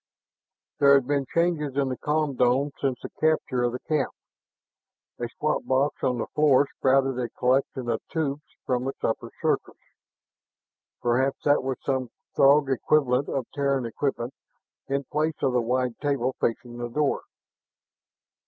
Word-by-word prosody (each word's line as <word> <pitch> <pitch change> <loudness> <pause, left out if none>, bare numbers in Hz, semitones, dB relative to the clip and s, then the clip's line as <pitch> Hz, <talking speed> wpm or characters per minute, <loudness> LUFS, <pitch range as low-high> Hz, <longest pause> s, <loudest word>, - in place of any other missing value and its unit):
There 140 0 +7
had 135 -2 +3
been 140 -1 0
changes 160 -5 0
in 140 -1 +2
the 130 - -2
com 150 -1 0
dome 125 +4 +2
since 135 -3 0
the - - -6
capture 155 -5 +2
of 120 0 +1
the 125 - -5
cap. 150 -3 0 1.1
A 120 - -3
squat 150 +5 -1
box 135 +2 +1
on 125 -1 +1
the 115 - -2
floor 145 -2 +5
sprouted 135 -1 +2
a 120 - -2
collection 130 0 0
of 115 -1 -1
tubes 150 -3 -1 0.2
from 125 0 0
its 135 - -6
upper 115 - -1
surface. - - 0 1.3
Perhaps 130 +3 +1
that 145 0 +4
was 130 -1 -2
some 130 -3 -1 0.3
Throg 140 0 +5
equivalent 135 0 +2
of 135 -3 -2
Terran 140 -3 0
equipment 120 +1 -2 0.5
in 140 +1 -1
place 155 +3 -1
on 135 -2 +2
the 125 - +3
wide 125 +1 0
table 135 -3 0
facing 120 +1 -2
the 120 0 -3
door. 145 +3 0
135 Hz, 155 wpm, -26 LUFS, 125-145 Hz, 1.3 s, There